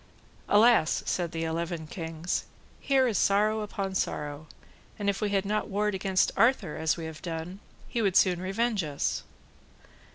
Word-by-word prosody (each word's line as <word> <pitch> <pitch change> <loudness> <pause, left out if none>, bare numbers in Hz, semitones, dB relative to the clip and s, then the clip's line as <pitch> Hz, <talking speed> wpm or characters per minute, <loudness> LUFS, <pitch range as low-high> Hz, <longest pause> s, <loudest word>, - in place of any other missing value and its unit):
Alas, 215 -5 +4
said 175 -3 -1
the 165 0 -3
eleven 165 0 -3
kings, 165 +1 -4 0.3
here 270 -2 +3
is 215 -6 +1
sorrow 215 +2 +3
upon 200 -2 -4
sorrow, 150 -4 -3 0.5
and 200 -1 +1
if 195 - -7
we 210 - +1
had 200 -1 +1
not 210 +2 -1
warred 210 +1 0
against 190 -1 +1
Arthur 225 - +2
as 160 +1 0
we 165 - -5
have 160 -1 -8
done, 170 +2 -5 0.3
he 235 - -2
would 195 -4 +1
soon 180 -2 +4
revenge 205 +2 0
us. 145 -2 -2
190 Hz, 160 wpm, -28 LUFS, 165-210 Hz, 0.5 s, Alas